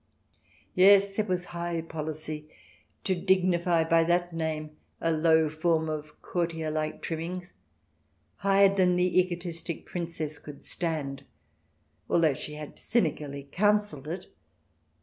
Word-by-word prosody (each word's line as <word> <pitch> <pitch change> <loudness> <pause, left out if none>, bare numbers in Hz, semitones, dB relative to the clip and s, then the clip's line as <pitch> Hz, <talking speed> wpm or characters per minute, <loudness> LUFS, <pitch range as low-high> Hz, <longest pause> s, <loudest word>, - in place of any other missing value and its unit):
Yes, 195 +2 +6
it 215 - +1
was 180 -1 -1
high 170 -1 -2
policy, 155 -1 -5 0.5
to 190 - +1
dignify 180 -2 +2
by 165 0 +4
that 175 0 +1
name 155 -2 -3 0.2
a 165 - +1
low 160 0 +4
form 160 +1 +1
of 150 -1 -6
courtier 165 -3 -2
like 155 0 -3
trimming, 170 +2 -4 0.9
higher 195 0 +4
than 180 -2 +4
the 180 0 +3
egotistic 175 -2 -3
Princess 165 -3 -4
could 145 -1 -11
stand, 145 -5 -3 0.9
although 160 -4 +4
she 150 +3 -5
had 150 -1 -9
cynically 150 - -1
counselled 205 -7 +1
it. 175 +4 -5
165 Hz, 120 wpm, -28 LUFS, 155-180 Hz, 0.9 s, Yes